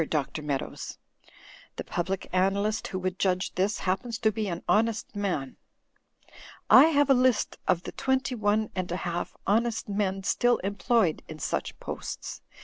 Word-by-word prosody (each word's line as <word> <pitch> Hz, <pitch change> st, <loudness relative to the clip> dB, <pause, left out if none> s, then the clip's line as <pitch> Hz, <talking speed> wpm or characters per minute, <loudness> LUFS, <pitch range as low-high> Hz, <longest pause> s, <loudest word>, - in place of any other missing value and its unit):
Dr. 150 Hz, 0 st, -1 dB
Meadows. 145 Hz, -3 st, -4 dB, 0.8 s
The -, -, -4 dB
Public 185 Hz, +2 st, -3 dB
Analyst 200 Hz, +3 st, +1 dB
who 185 Hz, -, -4 dB
would 185 Hz, 0 st, -3 dB
judge 185 Hz, -1 st, +1 dB
this, 195 Hz, +3 st, +1 dB
happens 215 Hz, +5 st, -1 dB
to 220 Hz, -, +2 dB
be 215 Hz, 0 st, -2 dB
an 170 Hz, -2 st, -4 dB
honest 225 Hz, 0 st, +1 dB
man. 180 Hz, -10 st, -2 dB, 1.1 s
I 265 Hz, -, +10 dB
have 290 Hz, -3 st, +3 dB
a -, -, +9 dB
list 255 Hz, -3 st, +2 dB
of 180 Hz, -1 st, +2 dB
the -, -, -6 dB
twenty 265 Hz, -1 st, 0 dB
one 215 Hz, -1 st, +1 dB
and 185 Hz, -2 st, -3 dB
a 175 Hz, -, -1 dB
half 175 Hz, 0 st, -3 dB
honest 225 Hz, +2 st, +1 dB
men 195 Hz, -1 st, -1 dB
still 245 Hz, +4 st, +3 dB
employed 200 Hz, -2 st, +1 dB
in 155 Hz, -, -8 dB
such -, -, -3 dB
posts. -, -, -6 dB
200 Hz, 155 wpm, -28 LUFS, 185-225 Hz, 1.1 s, I